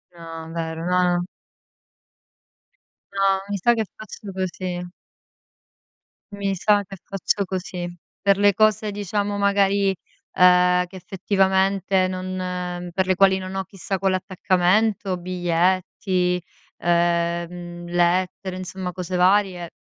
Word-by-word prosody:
No, 165 -1 -9
vero. 165 0 -4
No, 180 0 +2
no. 175 - -2 1.9
No, 195 -1 +2
mi 200 - -1
sa 240 +6 +3
che 220 -2 -1
faccio 210 -1 -9
così. 180 -1 -4 1.4
Mi 200 -1 -2
sa 205 +2 +3
che 195 0 -10
faccio 195 +1 -1
così. 180 -1 -4 0.3
Per 200 -1 +3
le 205 0 +4
cose 215 0 +2
diciamo 205 0 -2
magari, 200 -1 +2 0.4
ehm, 180 0 +5
che 185 +2 -15
effettivamente 190 0 +1
non 180 -1 -4
per 190 0 0
le 185 - +3
quali 190 0 +4
non 185 +1 -6
ho 190 - -1
chissà 195 0 -4
quell'attaccamento, 190 +1 +1
biglietti, 180 +1 0 0.4
ehm, 175 0 -1
lettere, 180 +2 0
insomma 185 0 -5
cose 180 0 -5
varie, 180 -2 +2
185 Hz, 110 wpm, -23 LUFS, 180-195 Hz, 1.9 s, ehm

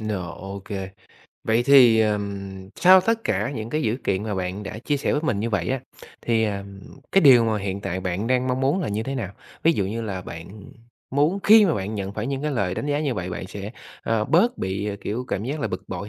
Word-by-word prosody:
Rồi, 100 -6 -3
ô 95 +1 -7
kê. 95 -3 -5 0.5
Vậy 110 +2 +2
thì, 125 -4 +7
ờm, 100 -3 -2
sau 185 +1 +7
tất 225 +4 0
cả 105 +4 0
những 115 -4 -5
cái 155 +1 -1
dữ 110 -3 0
kiện 95 0 0
mà 105 -1 -3
bạn 95 +2 -3
đã 105 +2 -6
chia 145 +5 -1
sẻ 140 - -1
với 150 - +1
mình 110 -11 0
như 115 +2 -2
vậy 90 -5 -1
á, 130 0 -1 0.4
thì, 115 -1 +2
ờm, 100 -2 -5 0.3
cái 195 - +6
điều 130 -7 +7
mà 110 -1 0
hiện 100 0 -4
tại 95 -2 -3
bạn 90 +3 -2
đang 130 +1 +1
mong 125 +1 0
muốn 140 +8 +1
là 160 - -2
như 105 +2 -2
thế 135 +4 -4
nào? 110 -8 -4 0.3
Ví 165 - +5
dụ 100 - 0
như 110 +4 -3
là 100 -4 -4
bạn 85 -2 -9 0.6
muốn 150 +8 +2
khi 215 0 +8
mà 170 -6 +2
bạn 100 +2 -3
nhận 100 -1 -4
phải 110 +2 -4
những 135 0 -3
cái 150 - -1
lời 100 -9 -1
đánh 145 - -4
giá 145 0 0
như 140 -5 -1
vậy 90 -2 -4
bạn 90 - -5
sẽ, 100 +2 -7 0.3
ờ, 110 -1 0
bớt 185 - +2
bị, 95 +2 -2
à, 100 - -3
kiểu, 120 +5 -3
cảm 100 - -2
giác 145 +5 -3
là - - -1
bực - - -6
bội 95 +2 -5
110 Hz, 255 wpm, -23 LUFS, 100-135 Hz, 0.6 s, khi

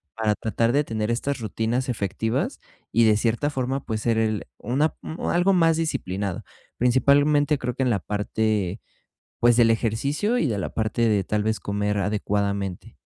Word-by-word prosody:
para 110 -2 +1
tratar 115 +2 0
de 145 - +3
tener 110 -4 -3
estas 130 +4 -1
rutinas 115 +3 -2
efectivas 110 0 -2 0.3
y, 115 +1 +4
de 110 -1 +5
cierta 120 +6 0
forma, 135 -1 -2
pues, 110 -2 -3
ser 115 -1 +1
el 110 -2 0
una 145 +6 0
mm, 160 - -7
algo 180 +3 +3
más 165 -3 +3
disciplinado. 100 - -2 0.3
Principalmente, 145 +4 +3
creo 125 -1 -3
que 135 - 0
en 130 - +1
la 105 -4 +1
parte, 105 0 -1 0.6
pues, 120 0 +4
del 115 -1 +5
ejercicio 140 - 0
y 170 - +1
de 110 -7 -1
la - - -3
parte 110 +1 0
de, 100 -3 +2
tal 105 +2 -1
vez, 110 0 0
comer 105 0 -1
adecuadamente. 100 -1 -2
115 Hz, 170 wpm, -24 LUFS, 105-135 Hz, 0.6 s, de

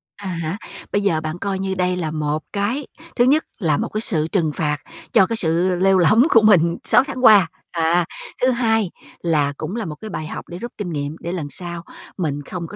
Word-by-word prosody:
À 200 -1 -8
há, 170 0 -3 0.3
bây 205 - +1
giờ 165 -6 +1
bạn 155 +1 -4
coi 195 0 -2
như 190 0 -2
đây 180 0 +1
là 160 -4 -2
một 155 0 -2
cái 225 +8 -1 0.3
thứ 240 - +4
nhất 295 +5 +3
là 155 -8 +1
một - - -2
cái 215 - -2
sự 160 -8 0
trừng 165 -4 0
phạt 150 -2 0 0.4
cho 205 -4 +6
cái 230 - -2
sự 175 +1 +2
lêu 190 +1 +3
lổng 185 +7 +5
của 225 - +6
mình 175 -6 +4
6 - - +4
tháng 260 -1 -3
qua. 205 -5 +8 0.2
À, 170 +1 +2 0.4
thứ 255 +1 +4
hai 225 -6 +1 0.3
là 150 -4 +1
cũng 160 +6 -4
là 230 -3 -3
một 150 - -5
cái 215 +8 -9
bài 155 -6 -5
học - - -7
để 175 - -7
rút 240 +5 -6
kinh 205 -4 -4
nghiệm, 145 0 -3
để 170 - -5
lần 170 -5 -3
sau 170 +1 -6 0.3
mình 145 -5 -2
không 170 +3 -6
có - - -10
180 Hz, 230 wpm, -21 LUFS, 160-205 Hz, 0.4 s, qua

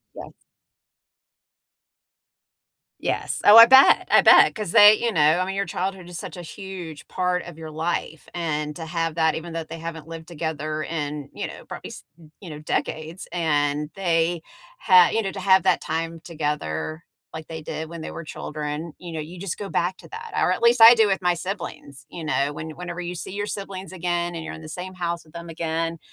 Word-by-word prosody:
Yes. - - -11 2.6
Yes. - - -2
Oh, 210 - +9
I 230 - +12
bet. 265 +3 +6
I - - +7
bet. - - +7
'Cause 210 -5 -5
they 210 +1 +9
you 235 0 -1
know, 160 - +2 0.2
I 185 - 0
mean, 195 +1 -4
your 200 - -1
childhood 185 0 -4
is 175 -2 -6
such - - -7
a 175 - -8
huge 175 -3 -9
part 180 -1 -1
of 175 -2 -11
your 160 -1 -8
life. 160 -2 -3
And 150 -3 -3
to 165 - -7
have 165 -1 -2
that 160 -1 +2
even 170 +1 -6
though 165 0 -3
they 165 +1 -9
haven't 165 -1 -7
lived 165 0 -9
together 155 -2 -4
in, 150 -3 -4
you - - -4
know, - - -11
probably, - - -8
s - - -10 0.4
you 180 - -9
know, 150 - -8
decades. 155 +2 -3
And 150 -3 0
they 170 -3 0 0.4
ha 185 -4 +6
you 225 - +2
know, 195 -3 -3
to 195 - -7
have 190 0 +4
that - - +3
time 165 +1 -4
together 150 - -4 0.3
like 160 -1 -8
they 160 -1 -7
did 160 +1 -5
when 170 -1 -8
they - - -6
were - - -7
children, 150 +2 -5
you 175 -1 -9
know, 160 - -4
you 165 +4 -8
just 195 -2 -4
go 200 -1 -5
back 180 +1 0
to - - -14
that. 450 0 -8
Or - - +2
at 185 - -2
least 235 0 +4
I 230 +2 +11
do 225 -2 +5
with 195 -1 0
my 180 -1 +2
siblings. 170 -6 -7
You 170 - -8
know? 145 -2 0
When 160 +2 -7
whenever 175 +2 -7
you 175 0 -5
see 180 - -6
your 205 +1 -3
siblings 195 -2 -6
again 175 -1 -2
and 165 -1 -6
you're - - -7
in - - -11
the - - -9
same 185 +3 -7
house 170 -1 -3
with 155 - -22
them 170 0 -8
again, 165 0 -3
170 Hz, 210 wpm, -23 LUFS, 160-185 Hz, 2.6 s, I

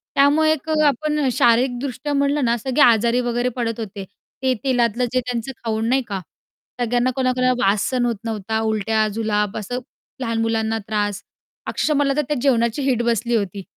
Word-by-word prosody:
त्यामुळे 295 +3 +4
एक 315 0 -3
अ, 310 -1 +2
आपण 300 +1 0
शारीरिकदृष्ट्या 250 +4 +1
म्हणलं 280 0 +1
ना 235 0 +2
सगळे 265 +5 -1
आजारी 235 0 +4
वगैरे 240 +1 0
पडत 230 -1 -2
होते, 205 -3 -6 0.4
ते 260 -1 +3
तेलातलं 245 -2 +1
जे 255 - +3
त्यांचं 245 0 -4
खाऊन 220 -1 -1
नाही 265 +2 +3
का, 200 -2 -3 0.6
सगळ्यांना 245 +1 +1
कोणाकोणाला 255 -1 +2
वास 200 +1 +2
सहन 250 -2 0
होत 235 -1 0
नव्हता, 220 0 -2
उलट्या, 220 0 +1
जुलाब 210 -2 -1
असं 235 +4 -4 0.4
लहान 230 -3 -1
मुलांना 225 0 0
त्रास. 205 -2 -1 0.5
अक्षरश: - - -1
मला 280 -1 +2
तर - - +4
त्या 295 - -1
जेवणाची 235 -1 +2
वीट 260 -4 +1
बसली 235 0 0
होती. 200 -2 -2
240 Hz, 170 wpm, -21 LUFS, 220-265 Hz, 0.6 s, त्यामुळे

